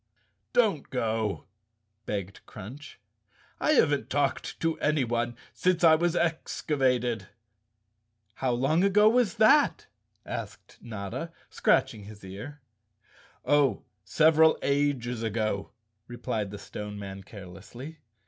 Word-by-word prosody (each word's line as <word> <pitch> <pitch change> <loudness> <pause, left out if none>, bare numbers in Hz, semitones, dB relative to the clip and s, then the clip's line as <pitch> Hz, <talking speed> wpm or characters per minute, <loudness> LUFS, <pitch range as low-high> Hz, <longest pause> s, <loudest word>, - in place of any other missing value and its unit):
"Don't 205 - +2
go," 110 -4 -1 0.6
begged 100 -1 -4
Crunch. 125 +10 -10 0.6
"I 310 - +3
haven't 145 - +2
talked 140 -1 -1
to 165 -1 -1
anyone 120 -5 0 0.2
since 180 -1 +1
I 160 -1 +8
was 170 +2 +2
excavated." 130 - 0 1.1
"How 130 +3 -1
long 135 +8 +2
ago 205 +2 +5
was 230 -4 +3
that?" 250 +7 +4 0.4
asked 115 -3 -7
Notta, 110 - -6 0.2
scratching 105 -2 +1
his 105 -1 -12
ear. 110 +11 -9 0.8
"Oh, 145 -2 +3 0.2
several 160 +7 +5
ages 140 -5 0
ago," 110 -3 -1 0.4
replied 110 -4 -3
the 105 - -7
Stone 105 +1 -7
Man 100 -1 -7
care¬ 95 0 -11
lessly. 125 +11 -10
125 Hz, 110 wpm, -28 LUFS, 110-160 Hz, 1.1 s, I